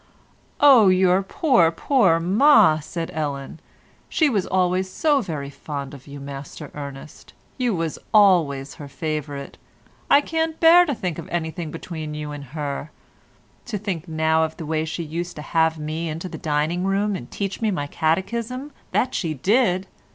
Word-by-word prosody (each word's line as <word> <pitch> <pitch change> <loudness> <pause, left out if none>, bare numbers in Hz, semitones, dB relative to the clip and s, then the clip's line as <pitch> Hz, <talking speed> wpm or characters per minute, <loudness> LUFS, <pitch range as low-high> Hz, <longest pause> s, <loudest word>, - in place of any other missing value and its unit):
"Oh, 265 -8 +7
your 185 0 +4
pore, 195 - +3
pore 185 - +3
ma!" 185 - +5
said 165 +2 -5
Ellen. 145 -1 -4 0.5
"She 310 -4 +2
was 200 -6 0
always 185 0 +1
so 290 +6 +2
very 150 - -5
fond 140 0 -6
of 140 -1 -12
you, 140 0 -9
Master 140 +1 -8
Ernest: 140 0 -9 0.3
you 245 -5 +1
was 165 -2 -3
always 165 -10 +4
her 145 - -7
favourite; 145 -2 -5 0.5
I 280 - +7
can't 320 +1 -1
abear 340 +2 +6
to 285 - -1
think 180 -6 -4
of 165 - -9
anything 165 -1 -3
between 155 -1 -6
you 150 -1 -5
and 145 -1 -7
her. 145 +1 -5 0.8
To 225 -3 -3
think 185 -4 -4
now 160 0 +2
of 160 0 -3
the 165 - -6
way 155 +1 -1
she 165 +2 -4
used 170 +3 -5
to 150 - -7
have 160 0 +1
me 155 +2 -4
into 160 +4 -5
the - - -8
dining 155 +3 0
room 195 +1 0
and 120 -8 -7
teach 200 +1 -4
me 220 - +2
my 180 -8 -2
catechism, 230 - -2 0.2
that 255 +1 +1
she 160 -4 -2
did! 190 - +2
165 Hz, 165 wpm, -23 LUFS, 150-200 Hz, 0.8 s, Oh